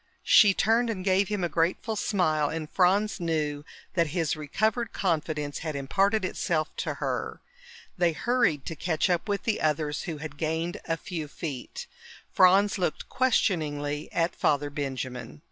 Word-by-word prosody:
She 200 -3 +6
turned 230 +2 +2
and 190 -4 -4
gave 190 0 +3
him 210 -3 -2
a - - +2
grateful 170 +7 0
smile, 155 -8 +1
and 160 -1 -4
Franz 195 +6 +2
knew 155 -4 -1 0.3
that 170 -2 +2
his 160 -3 +1
recovered 215 - -1
confidence 155 -5 -1
had 155 -2 -4
imparted 195 +9 +1
itself 155 -4 -1
to - - -2
her. - - -3 0.6
They 175 -1 +4
hurried 225 - +1
to 165 - -4
catch 175 +2 0
up 175 +4 -1
with 200 -1 -1
the 220 -2 0
others, 150 -1 0
who 165 -4 -4
had 150 -1 -8
gained 160 +2 -2
a 165 - -1
few 170 -5 -5
feet. 145 -3 -6 0.5
Franz 195 +3 +5
looked 175 -4 -2
questioningly 150 - 0
at 170 +1 0
Father 145 0 +1
Benjamin. 130 -2 -5
165 Hz, 155 wpm, -27 LUFS, 150-195 Hz, 0.6 s, She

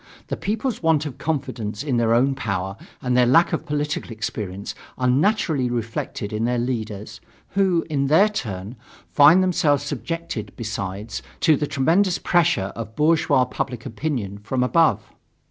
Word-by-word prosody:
The - - -1
people's 225 +4 -2
want 160 -2 +2
of 140 -5 -7
confidence 130 -7 -3
in 135 -5 0
their 115 -1 +2
own 135 +3 +3
power 100 -7 -3 0.3
and 125 -1 +1
their 125 -1 +5
lack 165 +8 +4
of 160 - -2
political 150 -1 -2
experience 105 -4 -5 0.2
are 125 - 0
naturally 145 - +2
reflected 115 -3 -4
in 110 +1 -1
their 120 +1 +1
leaders, 110 -3 -4 0.3
who, 190 -4 +2
in 140 -3 0
their 160 +9 +5
turn, 110 - -5 0.3
find 160 +6 +7
themselves 160 -6 +2
subjected, 150 -3 -4
besides, 105 -1 -4 0.2
to 160 -3 +5
the 150 +1 -2
tremendous 175 +8 +2
pressure 165 - +2
of 110 -1 -7
bourgeois 150 -4 +3
public 125 -1 -4
opinion, 115 -6 -3
from 125 +5 -1
above. 165 +5 +3
130 Hz, 150 wpm, -23 LUFS, 110-160 Hz, 0.3 s, find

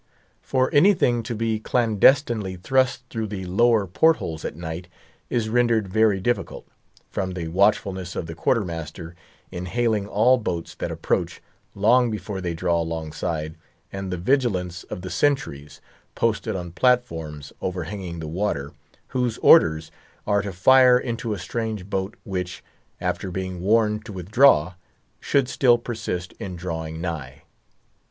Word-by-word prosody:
For 130 -1 0
anything 145 - +4
to 115 +1 -5
be 110 0 -1
clandestinely 115 -2 +2
thrust 130 +7 +1
through 110 -2 -3
the 95 -2 -5
lower 110 +3 +3
port 160 - +4
holes 80 -2 -6
at - - -4
night, 85 +2 -6 0.4
is 115 -3 0
rendered 115 -2 +2
very 105 0 +2
difficult, 120 +6 -2 0.5
from 95 -2 -2
the 85 -3 -4
watchfulness 95 -1 +1
of - - -3
the 80 - -7
quarter 105 +6 +1
master 80 0 -7 0.4
in 90 -1 -5
hailing 110 -1 0
all 115 +5 +4
boats 85 -6 -4
that - - -4
approach, - - -2 0.4
long 120 +5 +4
before 100 -2 -5
they 85 -2 -3
draw 85 0 +1
alongside, 80 -1 -4 0.4
and 95 -1 -4
the 90 - -2
vigilance 90 -5 0
of 95 - -7
the 95 - -7
sentries, 75 - -1 0.3
posted 115 -4 0
on 90 -2 -5
platforms 80 - 0
overhanging 90 0 -4
the 80 - -5
water, 75 -4 -2 0.4
whose 125 -3 -1
orders 80 0 +5 0.3
are 100 -1 +2
to 100 0 -5
fire 125 +7 +6
into 115 -2 -3
a 105 - -2
strange 110 0 -4
boat 95 0 -2
which, 90 -2 -5 0.4
after 95 - -2
being 95 -1 -4
warned 105 +1 +2
to 115 - -8
withdraw, 95 - +4 0.5
should 140 -3 +1
still 125 -2 +4
persist 110 -7 -5
in 95 -2 -5
drawing 80 -2 -5
nigh. 80 -7 -5
95 Hz, 145 wpm, -23 LUFS, 85-115 Hz, 0.5 s, fire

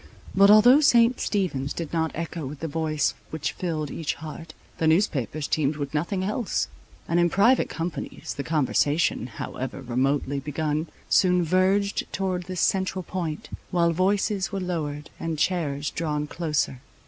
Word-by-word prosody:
But 200 +1 +6
although 245 +7 +8
St. 240 -4 +5
Stephen's 155 -9 -1
did 165 -2 -5
not 160 -1 +1
echo 165 0 -4
with 145 +1 -8
the 165 - -2
voice 155 -1 0 0.2
which 155 -2 -2
filled 155 -5 -3
each 160 -2 -2
heart, 160 +1 -9 0.2
the 160 - +2
newspapers 155 - +1
teemed 150 -1 +1
with 145 -2 -5
nothing 175 +5 -1
else; 210 +3 -1 0.4
and 170 +1 +2
in 175 0 +4
private 230 +9 +4
companies 165 0 -5
the - - -4
conversation 150 -2 +1
however 130 +1 -6
remotely 135 +2 0
begun, 150 +2 -2 0.2
soon 180 -1 +4
verged 190 +4 +1
towards 185 -2 -2
this 185 -2 -3
central 190 -1 +1
point, 165 -3 -4 0.2
while 170 -2 +2
voices 195 +2 +1
were 195 - -2
lowered 150 -5 -4
and 165 -1 -3
chairs 145 -4 0
drawn 150 -2 -2
closer. 150 -5 -2
165 Hz, 150 wpm, -25 LUFS, 150-185 Hz, 0.4 s, although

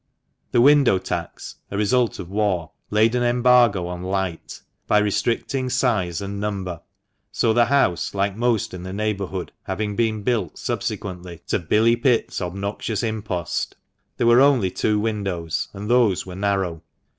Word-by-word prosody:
The 120 - +4
window 140 -6 +5
tax 95 - -5
— - - -48
a 100 - -4
result 115 +3 +1
of 85 - -7
war 95 -5 -1
— - - -49
laid 110 +2 +3
an 125 - +1
embargo 120 -5 +4
on 90 0 -5
light, 95 -2 -4 0.2
by - - +4
restricting 115 +5 0
size 110 -10 0
and 100 0 -5
number, 95 -5 -4 0.5
so 115 - +2
the 120 +1 +4
house, 110 - +1
like 100 0 0
most 115 -3 0
in 90 - -6
the 95 +1 -6
neighbourhood, 100 -3 -3
having 105 -1 -3
been 110 -2 0
built 110 -9 -1
subsequently 90 -3 -5
to - - +1
"Billy 110 +7 +3
Pitt's" 120 -3 +1
obnoxious 100 +5 -3
impost, 105 -6 -3 0.4
there - - +1
were 120 +2 +6
only 130 -10 +4
two 105 +3 0
windows, 95 -7 -2
and 100 +1 -7
those 120 -6 +3
were 90 - -8
narrow. 95 -4 -1
105 Hz, 155 wpm, -22 LUFS, 95-120 Hz, 0.5 s, were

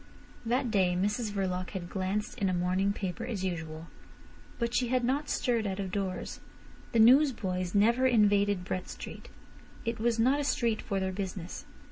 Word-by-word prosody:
That 245 0 +1
day 185 -4 +2
Mrs 210 +3 0
Verloc 185 -3 -2
had 175 -2 -6
glanced 195 +4 -3
at 195 - +2
a - - 0
morning 185 +3 +1
paper 200 +2 -4
as 220 -6 -3
usual. 165 -3 -4 0.7
But 235 0 -1
she 250 - +2
had 255 0 +1
not 275 +5 0
stirred 230 -4 0
out 190 0 -3
of 190 -2 -3
doors. 190 -1 -3 0.5
The - - 0
newsboys 220 - +4
never 235 +5 +4
invaded 205 -5 +3
Brett 185 -1 -3
Street. - - -8 0.6
It 230 -1 -2
was 235 0 +1
not 260 +5 +3
a - - 0
street 235 -6 +1
for 195 - -2
their 190 0 -1
business. 185 -2 -5
205 Hz, 170 wpm, -30 LUFS, 185-235 Hz, 0.7 s, newsboys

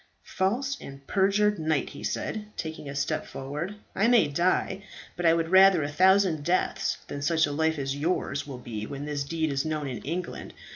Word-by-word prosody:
"False 260 +9 -1
and 135 0 -10
perjured 200 +2 +2
knight," 155 -3 0
he - - -10
said, 215 -1 -3
taking 160 -3 -5
a 140 - -6
step 140 - -1
forward, 150 +9 -5 0.2
"I 205 +4 +3
may 240 -2 +5
die; 180 +5 +1 0.3
but 175 -1 +1
I 165 - +6
would 165 -1 -1
rather 190 -3 +6
a 145 - -3
thousand 185 -1 +4
deaths 175 +4 0
than 145 - -5
such 160 +2 +3
a 145 - -4
life 160 +2 +1
as 135 -1 -2
yours 145 -2 -1
will 135 -3 -6
be 110 -3 -6
when 140 +1 -6
this 145 -1 -2
deed 160 +1 -1
is 135 0 0
known 155 -1 -2
in 125 -4 -4
England. 175 +4 -5
160 Hz, 195 wpm, -27 LUFS, 145-190 Hz, 0.3 s, I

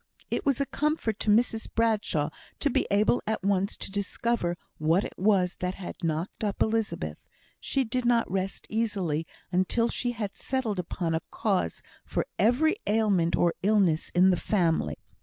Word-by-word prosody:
It - - -1
was 275 -2 +3
a 280 - +2
comfort 300 -8 -1
to - - -1
Mrs 225 +1 +2
Bradshaw 210 -9 +1 0.3
to 290 - +1
be - - +1
able 210 +4 +3
at 220 -3 -1
once 195 0 +1
to - - -5
discover 200 -2 -1 0.2
what 165 +6 +3
it - - -6
was 190 -2 +2
that 180 +1 -2
had 190 0 -8
knocked 165 +6 -2
up 205 -2 -1
Elizabeth; 210 - -2 0.4
she 270 - 0
did 250 +1 -2
not 240 -1 +3
rest 190 0 -2
easily 195 -8 -1 0.2
until 190 +6 +2
she 245 -1 -1
had 210 -4 -4
settled 240 -7 -2
upon 170 -1 -2
a 160 - 0
cause 190 - -1 0.2
for - - -2
every 270 - +3
ailment 205 -6 +2
or 170 -1 +2
illness 190 -6 +2
in 185 +2 +6
the 180 - +2
family. 170 -6 +1
205 Hz, 165 wpm, -28 LUFS, 180-230 Hz, 0.4 s, in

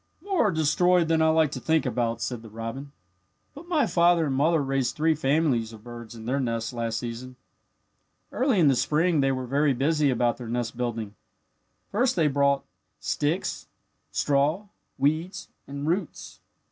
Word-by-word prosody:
"More 385 - +1
are - - +1
destroyed 165 +2 +2
than 160 -1 +3
I 160 - +4
like 160 -2 +3
to - - -5
think 160 -1 +1
about," 120 -2 -1
said 120 -3 -4
the 110 - -12
robin. 115 +6 -6 0.6
"But 295 +4 -12
my 320 -5 +2
father 170 -1 +3
and 135 -3 -1
mother 160 +4 +3
raised 135 -2 -1
three 160 +1 +2
families 135 -6 +1
of 110 -1 -13
birds 120 -1 -9
in 110 -1 -10
their 130 +4 0
nest 115 -3 -2
last 115 -2 -2
season. 120 +2 -6 1.0
"Early 255 -6 +1
in 160 - +5
the 135 - +4
spring 155 +4 +2
they 135 0 +2
were 130 -1 -3
very 140 +3 +2
busy 145 +3 +1
about 120 -2 +1
their 120 -3 -8
nest 120 0 -2
building. 115 -4 -3 0.8
First 240 +5 +1
they 165 -3 +3
brought 140 -1 +2 0.4
sticks, 150 +5 -2 0.4
straw, 150 +8 +1 0.3
weeds, 155 +7 -1 0.2
and 140 +1 -5
roots. 170 +2 -3
140 Hz, 170 wpm, -26 LUFS, 120-160 Hz, 1.0 s, in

